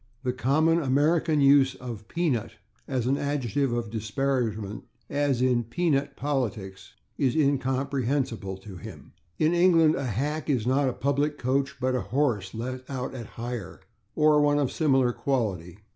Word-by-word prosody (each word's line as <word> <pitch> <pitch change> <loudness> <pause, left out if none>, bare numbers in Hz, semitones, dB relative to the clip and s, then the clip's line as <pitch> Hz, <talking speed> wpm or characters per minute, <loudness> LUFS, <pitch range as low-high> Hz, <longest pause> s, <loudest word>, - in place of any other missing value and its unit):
The 125 -1 0
common 155 +7 +2
American 150 +3 +2
use 140 -1 +5
of 115 -4 -8
/peanut/ 155 -10 -1 0.3
as 130 -4 -1
an 135 +3 +1
adjective 140 -2 -1
of 120 -2 -2
disparagement, 110 -2 -2 0.3
as 140 -3 +1
in 125 -2 +2
/peanut 140 +3 0
politics/, 105 -9 -3 0.2
is 130 -3 +2
incomprehensible 135 -6 0
to 95 -1 -11
him. - - -11 0.2
In 155 +2 +2
England 170 -3 +5
a 140 -4 -2
/hack/ 145 +8 -2
is 125 -6 +1
not 135 +2 +2
a - - -3
public 140 +3 0
coach, 135 +2 -1
but 130 0 0
a 125 - 0
horse 110 -6 -1
let 125 +3 -4
out 130 -1 -4
at 120 -4 -7
hire, 115 -5 -5 0.4
or 150 -1 +4
one 145 0 +3
of 140 -3 +1
similar 135 -5 +2
quality. 100 - -2
130 Hz, 150 wpm, -26 LUFS, 120-145 Hz, 0.4 s, use